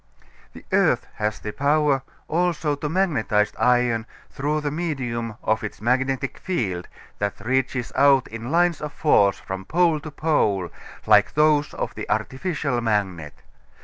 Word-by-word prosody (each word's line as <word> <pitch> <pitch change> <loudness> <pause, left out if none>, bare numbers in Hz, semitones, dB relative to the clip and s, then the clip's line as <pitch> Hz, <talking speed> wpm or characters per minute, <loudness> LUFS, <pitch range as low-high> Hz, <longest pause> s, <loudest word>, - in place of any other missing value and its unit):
The - - -13
earth - - +3
has 105 0 -1
the 105 - -6
power 145 -1 +2 0.3
also 165 -2 0
to 145 +1 -3
magnetize 125 - +1
iron 120 -2 +2 0.2
through 150 +2 -1
the 145 -1 -2
medium 125 -9 -3
of 110 0 0
its 105 - -6
magnetic 130 +4 0
field, 95 - -2 0.3
that 100 -1 -2
reaches 125 +1 -1
out 135 -1 +4
in 115 +2 -6
lines 170 +1 +2
of 150 -1 -4
force 100 -10 +3
from 95 0 -6
pole 165 - +2
to 155 - -8
pole 105 - 0 0.3
like 105 -1 +4
those 150 -1 +3
of - - -3
the - - -7
artificial 140 -3 -1
magnet. 95 -9 -2
130 Hz, 145 wpm, -23 LUFS, 110-150 Hz, 0.3 s, out